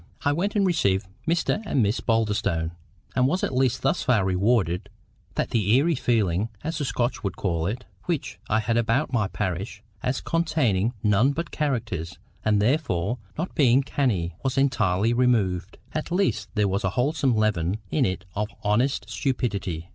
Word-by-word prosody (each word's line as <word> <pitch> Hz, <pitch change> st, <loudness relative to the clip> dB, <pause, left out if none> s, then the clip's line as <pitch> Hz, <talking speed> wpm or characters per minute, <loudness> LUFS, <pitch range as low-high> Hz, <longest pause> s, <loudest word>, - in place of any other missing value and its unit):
I 145 Hz, -, +4 dB
went 195 Hz, +8 st, -1 dB
and 200 Hz, -2 st, +3 dB
received 100 Hz, -, +2 dB, 0.2 s
Mr 170 Hz, +5 st, +1 dB
and 135 Hz, -, +1 dB
Miss 105 Hz, +4 st, +1 dB
Boulderstone, 105 Hz, -7 st, 0 dB, 0.4 s
and 130 Hz, 0 st, +4 dB
was 180 Hz, +7 st, 0 dB
at -, -, 0 dB
least 130 Hz, -1 st, +1 dB
thus 135 Hz, -, +2 dB
far 110 Hz, -7 st, +2 dB
rewarded—that 95 Hz, -2 st, -1 dB
the 105 Hz, 0 st, +3 dB
EERIE 165 Hz, +5 st, +3 dB
feeling, 110 Hz, -, +1 dB
as 160 Hz, +1 st, -3 dB
the 145 Hz, -, -1 dB
Scotch 120 Hz, -1 st, -1 dB
would 95 Hz, -3 st, -2 dB
call 85 Hz, -4 st, -1 dB
it, 120 Hz, +5 st, -4 dB, 0.2 s
which 170 Hz, -5 st, -2 dB
I 110 Hz, +1 st, +3 dB
had 115 Hz, +2 st, 0 dB
about 120 Hz, +5 st, +1 dB
my 110 Hz, -5 st, +2 dB
parish, 100 Hz, +2 st, -4 dB, 0.2 s
as 125 Hz, +1 st, -1 dB
containing 135 Hz, -, +1 dB
none 110 Hz, +7 st, +4 dB
but 170 Hz, +3 st, -4 dB
CHARACTERS, 115 Hz, -, -2 dB, 0.3 s
and 105 Hz, -1 st, +3 dB
therefore 120 Hz, -, +1 dB, 0.2 s
not 170 Hz, +4 st, -3 dB
being 135 Hz, -2 st, +4 dB
CANNIE, 105 Hz, -, 0 dB
was 130 Hz, 0 st, -1 dB
entirely 115 Hz, -6 st, +2 dB
removed. 105 Hz, -7 st, +1 dB, 0.2 s
At 155 Hz, +2 st, -3 dB
least 175 Hz, -, 0 dB
there 105 Hz, -2 st, +3 dB
was 100 Hz, +2 st, -1 dB
a 95 Hz, -, +2 dB
wholesome 135 Hz, -1 st, +2 dB
leaven 105 Hz, -4 st, +1 dB
in 145 Hz, -, +2 dB
it 95 Hz, -2 st, -1 dB
of 105 Hz, +1 st, -1 dB, 0.2 s
honest 120 Hz, +7 st, +1 dB
stupidity. 100 Hz, -, -2 dB
115 Hz, 165 wpm, -25 LUFS, 100-135 Hz, 0.4 s, I